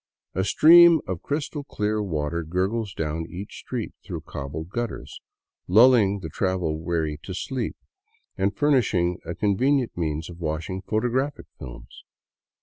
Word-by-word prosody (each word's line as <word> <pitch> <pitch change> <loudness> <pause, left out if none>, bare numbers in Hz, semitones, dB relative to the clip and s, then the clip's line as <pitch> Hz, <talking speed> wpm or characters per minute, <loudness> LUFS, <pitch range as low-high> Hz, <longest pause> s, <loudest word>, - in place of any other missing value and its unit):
A 95 - 0
stream 170 - +7
of 90 -1 -4
crystal 145 +2 -3
clear 105 -5 -1
water 85 -3 -2
gurgles 95 +6 -1
down 80 +1 -3
each 95 +3 -8
street - - -5
through - - -6
cobbled 75 +4 -6
gutters, 120 0 -5 0.5
lulling 105 -1 +5
the - - -6
travel 90 -5 -1
weary 80 -3 -2
to 95 - -7
sleep 125 +2 -3 0.3
— 455 +1 -42
and 100 +1 -1
furnishing 105 -12 +2
a 85 +1 -5
convenient 125 +6 +1
means 80 -1 -2
of 85 -1 -11
washing 80 +3 -3
photographic 125 +8 -1
films. - - -11
95 Hz, 140 wpm, -25 LUFS, 80-120 Hz, 0.5 s, stream